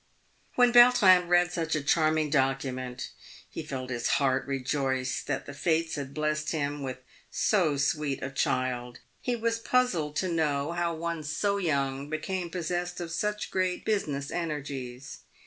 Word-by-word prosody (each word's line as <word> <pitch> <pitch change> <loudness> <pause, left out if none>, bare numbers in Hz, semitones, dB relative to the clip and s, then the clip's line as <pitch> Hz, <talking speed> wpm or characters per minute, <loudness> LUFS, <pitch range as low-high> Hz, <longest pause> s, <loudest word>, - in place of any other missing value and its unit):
When 245 -1 +5
Yautrin 210 -8 +7
read 175 0 +4
such 165 -2 -1
a 155 - -2
charming 155 0 +2
document, 130 -2 -1 0.4
he - - -6
felt 135 -4 -5
bis 120 -1 -2
heart 135 -1 +1
rejoice 135 -1 -1
that 135 -2 -3
the 145 - -8
fates 160 +2 0
had 140 -2 -4
blessed 155 +1 -1
him 145 -2 -2
with 130 -2 -4 0.3
so 170 -9 +2
sweet 145 -1 0
a 135 - -3
child. 125 -2 -1 0.2
He 245 - -1
was 230 0 -1
puzzled 195 -12 +1
to 185 - 0
know 155 -3 0
how 170 -1 -1
one 165 0 -3
so 180 +7 0
young 140 -5 -1
became 175 +3 -3
possessed 175 +1 -3
of 170 -2 -5
such 210 +5 -2
great 185 -1 -1
business 145 -10 -1
energies. 140 -6 -5
155 Hz, 150 wpm, -28 LUFS, 135-175 Hz, 0.4 s, Yautrin